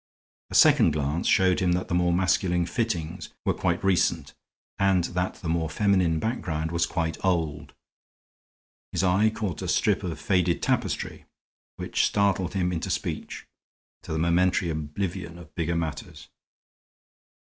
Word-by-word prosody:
A - - -6
second 80 - +6
glance 75 +3 -1
showed 95 -2 +4
him 90 -2 +2
that 90 +1 -1
the - - -4
more 90 0 +2
masculine 90 -1 +1
fittings 90 -5 -3 0.2
were - - +2
quite 85 +1 -1
recent, 85 -6 +1 0.5
and 95 -2 +3
that 90 +2 -2
the 85 - -8
more 80 -1 0
feminine 90 -2 +2
background 80 -7 -2
was 85 0 +1
quite 80 -2 -3
old. 75 -6 -1 1.2
His - - -1
eye 95 +4 +3
caught 105 -6 -4
a - - -4
strip - - +2
of 85 -4 -5
faded 90 -1 +1
tapestry, - - -1 0.5
which - - 0
startled 100 -3 0
him 90 -2 +1
into 80 -2 -3
speech, - - -4 0.6
to - - -9
the 80 - -1
momentary 85 +1 +2
oblivion 85 +3 -4
of 80 -3 -14
bigger 85 -1 -1
matters. 80 -3 -5
85 Hz, 145 wpm, -26 LUFS, 80-95 Hz, 1.2 s, second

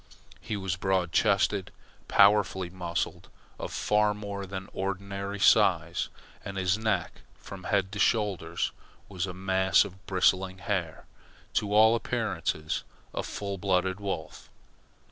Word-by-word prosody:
He 105 - -4
was 95 -3 -2
broad 95 -2 0
chested, 100 0 +2 0.4
powerfully 100 -3 +4
muscled, 85 -2 -3 0.3
of - - -5
far 105 0 +2
more 100 -1 -5
than 95 0 -6
ordinary 100 +1 -4
size, - - +4 0.3
and 100 0 -6
his 95 0 +2
neck 110 0 -1 0.2
from 95 -2 -10
head 95 -2 +1
to 105 - -5
shoulders 95 -7 +1 0.4
was 95 -1 -3
a 90 - -5
mass 95 0 +3
of 95 +1 -11
bristling 95 0 +2
hair 95 -6 -3 0.5
to 105 - 0
all 110 +2 +6
appearances 80 -8 -2 0.3
a - - -1
full 100 -2 -5
blooded 95 0 +1
wolf. 95 -6 -5
95 Hz, 125 wpm, -28 LUFS, 95-100 Hz, 0.5 s, all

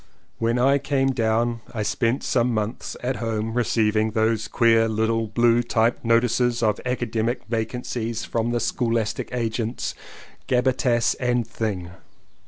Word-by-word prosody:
When 115 +1 +1
I 135 +3 +4
came 135 -1 +1
down 115 -1 0
I 110 - -1
spent 115 +4 0
some 125 -1 +1
months 110 +1 -3
at 125 +1 -1
home 115 -1 -2
receiving 110 -2 +1
those 110 0 +1
queer 115 -1 +3
little 110 +1 0
blue 120 +2 +3
typed 115 0 +1
notices 120 +1 +2
of 105 -2 +1
academic 120 -1 -1
vacancies 115 0 -3
from 115 0 -1
the 120 0 0
scholastic 115 -2 -1
agents, 115 -1 -2 0.5
Gabbitas 125 -2 +2
and 125 -2 +1
Thing. 100 -6 -3
115 Hz, 130 wpm, -23 LUFS, 110-120 Hz, 0.5 s, I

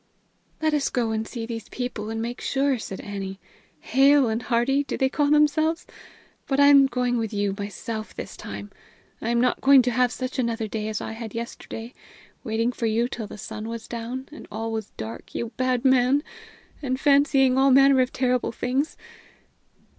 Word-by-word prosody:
"Let 310 -1 +2
us 295 -2 +1
go 235 -3 0
and 220 0 -2
see 230 -3 -5
these 230 -1 -6
people 245 -4 -4
and 225 0 -3
make 235 +2 -4
sure," 270 -2 +1
said 195 -3 -6
Annie. 195 -1 -6 0.4
"'Hale 270 0 +4
and 220 +2 -1
Hearty,' 255 +4 +1
do - - -4
they 265 -1 +2
call 285 +1 +1
themselves? 310 +3 +3 0.6
But 270 0 0
I'm 285 -1 +7
going 245 -1 0
with 225 -2 -2
you 205 -2 0
myself 210 +2 -6
this - - -7
time! 100 0 -8 0.5
I'm 235 +1 +1
not 250 +1 +1
going 270 -1 +7
to 245 - 0
have 250 +1 +2
such 255 +1 -4
another 230 -2 -1
day 215 0 -3
as 215 -1 -3
I - - -5
had 225 -1 -7
yesterday 230 0 -6 0.5
waiting 230 0 0
for 235 -2 -2
you 230 +2 +1
till 230 -4 -6
the - - -10
sun 215 +2 -6
was 230 -1 -6
down, 240 +3 -5
and 305 - -11
all 225 +2 -3
was 220 -2 -4
dark, 110 +1 -8
you 235 - -2
bad 255 0 0
man! 260 +2 +4 0.6
and 260 -2 -2
fancying 275 -2 +4
all 270 +1 +4
manner 270 0 +6
of 255 - 0
terrible 250 -1 0
things! 260 +6 -2
245 Hz, 185 wpm, -25 LUFS, 225-270 Hz, 0.6 s, I'm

